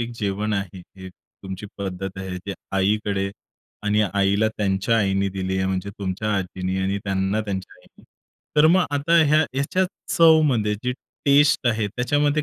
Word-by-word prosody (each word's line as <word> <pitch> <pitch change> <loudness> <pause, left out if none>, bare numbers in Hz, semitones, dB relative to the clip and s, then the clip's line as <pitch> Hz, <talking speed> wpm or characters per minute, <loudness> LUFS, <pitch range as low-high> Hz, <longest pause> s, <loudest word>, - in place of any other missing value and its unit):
एक 120 0 -3
जेवण 105 +1 -1
आहे, 95 -2 -3 0.2
हे 95 0 -9
तुमची 95 +2 -10
पद्धत 95 -1 -5
आहे, 95 -1 -5
ते 100 +2 -6 0.2
आईकडे 100 0 0 0.5
आणि 105 +1 +2
आईला 100 +2 +2
त्यांच्या 100 +2 +1
आईने 100 -1 +1
दिली 95 0 -3
आहे 95 - 0
म्हणजे 95 +1 -2
तुमच्या 100 +2 -2
आजींनी 95 0 -3
आणि 95 +1 0
त्यांना 95 +1 0
त्यांच्या 100 -3 -5
आईने. - - -23 0.5
तर 150 - +7
मग 180 +3 +4
आता 145 +4 +2
ह्या 150 +1 +4
ह्याच्या 140 +8 +1 0.3
चवमध्ये 150 - +4
जी 125 - +1 0.3
टेस्ट 140 -1 +4
आहे 110 -2 0
त्याच्यामध्ये 145 +7 +1
100 Hz, 155 wpm, -23 LUFS, 95-125 Hz, 0.5 s, तर